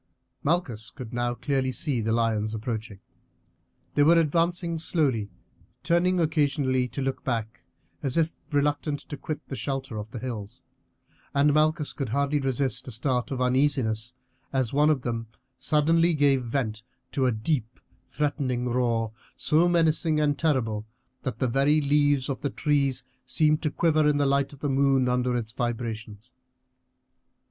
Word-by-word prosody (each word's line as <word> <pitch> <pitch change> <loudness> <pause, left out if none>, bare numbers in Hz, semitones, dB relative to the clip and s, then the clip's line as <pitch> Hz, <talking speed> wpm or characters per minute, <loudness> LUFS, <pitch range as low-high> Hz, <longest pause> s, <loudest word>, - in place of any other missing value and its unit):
Malchus 135 -9 -1
could 125 -1 -9
now 120 0 -1
clearly 130 +1 0
see 130 -2 -1
the 110 +1 -1
lions 110 -1 +1
approaching. 110 -2 -4 0.9
They - - +2
were 165 +4 +6
advancing 170 +1 +1
slowly, 135 - +1 0.5
turning 180 +2 +2
occasionally 145 -5 +1
to 135 +2 -4
look 135 0 -3
back 115 -3 -3 0.4
as 135 +1 +1
if 165 0 +2 0.2
reluctant 145 0 0
to 145 - -4
quit 155 +1 -6
the 135 - -5
shelter 135 -4 -3
of 105 +1 -7
the 120 - -7
hills; 110 -4 -6 0.7
and 145 +1 +4
Malchus 155 0 +2
could 135 -5 -4
hardly 140 +4 +1
resist 135 -1 -1
a - - -5
start 125 +2 0
of 130 -2 -3
uneasiness 125 -3 +1 0.4
as 130 -3 0
one 150 +2 +4
of 140 -5 +1
them 115 -1 -3 0.3
suddenly 165 +2 +3
gave 140 -3 +3
vent 115 -3 -2 0.3
to 130 -2 +1
a - - +3
deep, 120 +1 -2 0.3
threatening 135 -4 -1
roar, 115 -2 0 0.2
so 160 +3 +3
menacing 160 -2 +2
and 145 -1 +1
terrible 115 -9 0 0.3
that 130 -5 -4
the 130 - 0
very 140 +5 +3
leaves 145 -2 +2
of 135 - -3
the 140 - -1
trees 140 -4 0 0.2
seemed 155 +2 +2
to 155 - 0
quiver 155 0 +2
in 150 -1 +3
the 145 - +2
light 140 0 +1
of 145 -1 -14
the 145 - -1
moon 135 -1 +3
under 125 0 +1
its 110 -2 -4
vibrations. 115 -2 -4
135 Hz, 155 wpm, -26 LUFS, 120-150 Hz, 0.9 s, were